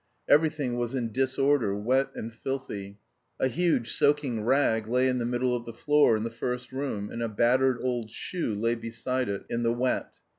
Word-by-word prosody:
Everything 145 -5 +3
was 120 +2 -2
in 120 -3 -2
disorder, 130 -3 +1
wet 130 +6 +1
and 115 +1 -6
filthy; 110 -6 -5 0.4
a - - +3
huge 150 -4 +1
soaking 145 -7 +2
rag 115 -3 +2
lay 125 +3 +2
in 125 -1 +1
the 120 - -1
middle 125 +1 0
of 120 -1 -5
the 115 - -7
floor 145 -2 +4
in 110 - -3
the 115 - -3
first 125 +2 -4
room, 130 -7 -3
and 115 - -5
a 115 - -1
battered 125 +4 +3
old 120 -3 -2
shoe 120 - -3
lay 115 +3 +1
beside 120 +1 -3
it 100 -1 -4
in 120 - -2
the 115 0 +2
wet. 125 +2 -1
120 Hz, 190 wpm, -28 LUFS, 115-130 Hz, 0.4 s, floor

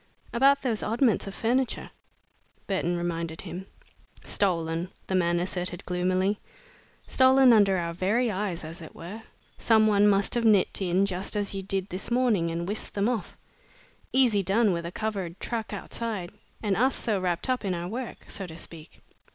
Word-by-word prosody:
"About 275 +3 +4
those 230 -5 0
oddments 230 -1 +1
of 195 - -6
furniture?" 250 +3 0 0.7
Burton 175 -3 0
reminded 170 -1 -3
him. 190 +2 -7 0.6
"Stolen," 170 -2 0 0.2
the - - -4
man 175 -2 +2
asserted 180 0 -2
gloomily, 185 +3 0 0.7
"stolen 260 -1 +6
under 200 -3 +5
our 170 -1 -2
very 215 +7 +1
eyes, 185 -4 -3
as 165 +3 -8
it 160 - -11
were. 190 +7 -8 0.4
Some 220 -1 +4
one 205 -1 +4
must 200 -1 +3
have 240 - +1
nipped 210 -3 +3
in 185 +1 +2
just 190 +1 -2
as 205 -1 0
you 195 - -3
did 195 0 -2
this 185 +2 -4
morning, 235 -9 +2
and 170 +1 -3
whisked 210 +2 -4
them 200 +1 +1
off. 225 -8 -3 0.7
Easy 245 -6 +4
done 200 +2 +2
with 170 0 -3
a - - -6
covered 195 -4 -4
truck 230 -3 -3
outside 210 -6 -4 0.3
and 205 -2 +1
us 255 +7 +2
so 210 -4 -1
wrapped 175 +2 0
up 255 -2 0
in 190 -3 -1
our 170 0 -4
work, 235 +5 -6
so 195 - -6
to 160 -1 -10
speak." 165 -1 -10
195 Hz, 170 wpm, -27 LUFS, 175-225 Hz, 0.7 s, stolen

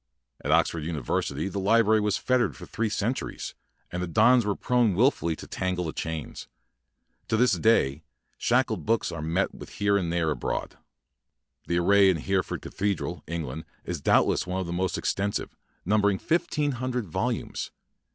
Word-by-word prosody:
At 75 - -1
Oxford 80 0 +2
University 75 0 -2
the 100 0 -3
li 105 +4 +4
brary 110 0 +3
was 105 -1 +1
fettered 125 -1 +1
for - - -10
three 115 -1 -2
cen 105 +3 0
turies, - - -6 0.4
and 90 - -3
the 90 - -2
dons 110 +5 +4
were 100 - +1
prone 120 -6 +2
wil 125 +8 +5
fully 85 - -3
to - - -10
tangle 90 -1 -2
tiie 80 - -4
chains. 80 -2 -5 0.8
To 110 - +1
this 125 +2 +4
iay 75 -11 +3 0.4
shackled 120 -7 +1
books 115 -1 +1
are 85 -2 -5
met 85 +5 0
with - - -10
here 100 0 +2
and 85 -4 -1
there 85 -2 +1
abroad. 65 - -3 0.9
The 85 - +1
array 100 +2 +5
in 90 - +2
Hereford 95 +4 -1
Cathedra], 100 -3 -2
England, 80 -2 -4 0.2
is - - -4
doubtless - - +3
the 90 -1 -3
most 95 +1 -1
extensive, 100 +1 -2 0.3
numbering 105 0 +3
fifteen 150 - 0
hun 130 0 -3
dred 125 -3 -2
volumes. 80 - -2
95 Hz, 170 wpm, -27 LUFS, 85-110 Hz, 0.9 s, wil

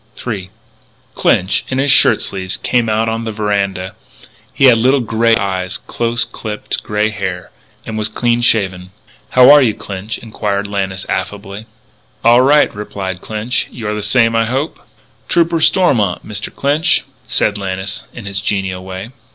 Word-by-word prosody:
III 100 -6 -4 0.6
Clinch, 95 +2 +1
in 130 - -2
his 135 +1 +2
shirt 120 -5 +5
sleeves, 95 -1 -4
came 120 -3 0
out 110 +1 +1
on 115 +1 -2
the 110 - -3
veranda. 100 -3 -2 0.6
He 135 - +2
had 120 -3 +6
little 130 +4 +3
light 120 - -5
grey 115 0 +3
eyes, 95 -2 -2
close 115 0 -2
clipped 105 -2 -5
grey 105 +1 0
hair, 90 -4 -5 0.3
and 110 -1 -4
was 105 - 0
clean 120 +2 0
shaven. 95 -6 +1 0.4
"How 130 +2 +7
are 145 0 +8
you, 115 -5 +2
Clinch," 100 +2 -6
inquired 105 -3 -3
Lannis 95 -2 -3
affably. 100 +2 -4 0.6
"All 120 +2 +6
right," 145 +3 +4
replied 95 -3 -5
Clinch; 110 +3 -2
"you're 105 -3 -4
the 105 - -3
same, 115 +2 +3
I 115 0 +3
hope." 135 +7 -2 0.5
"Trooper 170 -1 +2
Stormont, 125 - +2
Mr. 105 -1 -5
Clinch," 145 +3 +1 0.2
said 105 -1 +1
Lannis 95 +1 -4
in 115 - -10
his 100 0 -3
genial 95 -3 -2
way. 95 +4 -7
105 Hz, 160 wpm, -16 LUFS, 100-120 Hz, 0.6 s, are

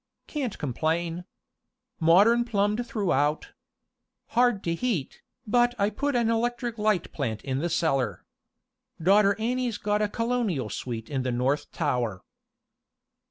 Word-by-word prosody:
"Can't 270 -8 -3
complain. 165 +5 -2 0.7
Modern 200 +9 +5
plumbed 210 +1 0
throughout. 155 - 0 0.8
Hard 240 -4 +2
to 170 - 0
heat, 175 - -2 0.2
but 240 +2 +3
I 200 0 +1
put 285 +6 -1
an 235 -2 +2
electric 235 0 -1
light 210 -4 +1
plant 115 -7 -3
in 135 -1 -2
the 170 +4 -1
cellar. 155 -6 0 0.7
Daughter 200 +4 +4
Annie's 240 0 -1
got 210 0 0
a 210 - +1
Colonial 230 - -1
suite 115 +1 -5
in 135 -2 0
the 130 0 -1
North 135 +5 0
Tower." 125 - -1
200 Hz, 125 wpm, -27 LUFS, 145-235 Hz, 0.8 s, Modern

